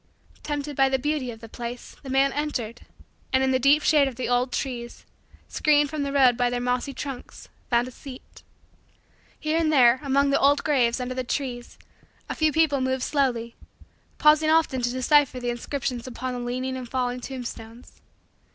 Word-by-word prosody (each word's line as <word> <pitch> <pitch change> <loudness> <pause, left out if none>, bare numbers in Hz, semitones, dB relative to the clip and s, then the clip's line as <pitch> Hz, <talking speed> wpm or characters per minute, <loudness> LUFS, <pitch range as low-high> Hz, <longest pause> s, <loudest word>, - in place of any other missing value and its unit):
Tempted 290 -1 -4
by 270 0 +3
the 265 - +1
beauty 290 -1 -2
of 225 -1 -9
the 225 - -9
place 240 +2 -8
the 270 - -9
man 270 +1 +2
entered, 245 -6 -3 0.5
and, 260 0 +3
in 265 - +2
the 260 - +2
deep 280 +4 +4
shade 295 -3 +4
of 265 - -5
the 255 - -3
old 245 +1 +1
trees, 245 -2 -5 0.4
screened 295 -1 +2
from 310 -2 -3
the 280 0 -2
road 265 -3 +5
by 245 0 +1
their 245 0 -2
mossy 250 +2 -1
trunks, 270 -2 -8 0.2
found 240 0 +2
a - - -8
seat. 260 +1 -12 1.0
Here 310 +1 0
and 320 -2 +1
there, 255 -3 +5
among 280 0 +2
the 275 - +3
old 285 +1 +3
graves 255 -5 +2
under 250 0 -3
the 255 0 -3
trees, 250 -2 -4 0.5
a - - -3
few 310 -1 +1
people 300 -3 +2
moved 260 0 -1
slowly; 240 -5 -1 0.6
pausing 310 +1 +4
often 315 -5 +2
to 240 - 0
decipher 260 +1 +2
the 245 -1 -2
inscriptions 245 0 -4
upon 255 +1 -5
the 245 - -4
leaning 255 +2 -3
and 255 -2 -7
fallen 250 -1 -2
tombstones. 240 -2 -9
260 Hz, 185 wpm, -25 LUFS, 245-285 Hz, 1.0 s, road